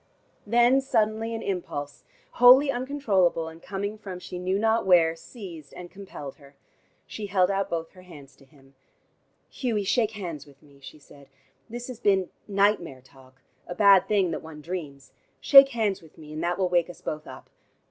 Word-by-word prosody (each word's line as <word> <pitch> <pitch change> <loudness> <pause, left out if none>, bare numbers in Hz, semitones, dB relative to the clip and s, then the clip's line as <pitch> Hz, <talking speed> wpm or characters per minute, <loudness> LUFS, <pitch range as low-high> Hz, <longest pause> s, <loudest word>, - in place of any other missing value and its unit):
Then 240 +4 +4
suddenly 225 -3 -1
an 225 - -6
impulse, 145 -7 -5 0.3
wholy 260 +3 +7
uncontrollable, 215 - 0
and 165 +1 -14
coming 200 +2 -5
from 195 -4 -8
she 180 0 -8
knew 185 +2 -1
not 225 +2 +1
where, 165 -3 +4
seized 165 - -11
and 175 -1 -10
compelled 185 -8 -10
her. 140 -2 -19 0.5
She 210 -2 -7
held 185 -1 +2
out 195 0 -1
both 165 -1 -4
her 185 - -16
hands 150 -7 -14
to 135 - -20
him. 135 0 -23 0.8
"Hughie, 230 -6 -2
shake 220 +2 +1
hands 170 -8 -7
with 140 0 -20
me," 140 -2 -21
she 135 - -12
said. 140 -1 -18 0.4
"This 240 +1 -7
has 250 -3 -8
been 195 -5 +1 0.2
nightmare 200 -9 0
talk, 130 0 -21 0.2
a 175 - -6
bad 200 -1 +5
thing 195 -5 +1
that - - -4
one 160 -1 -11
dreams. 150 -5 -7 0.3
Shake 275 - +8
hands 220 -6 -1
with 160 -2 -19
me, 155 -1 -12
and 155 +2 -5
that 175 +1 -1
will 190 -1 +1
wake 175 -1 +1
us 175 0 -12
both 155 -2 -6
up. - - -12
185 Hz, 180 wpm, -26 LUFS, 155-215 Hz, 0.8 s, Shake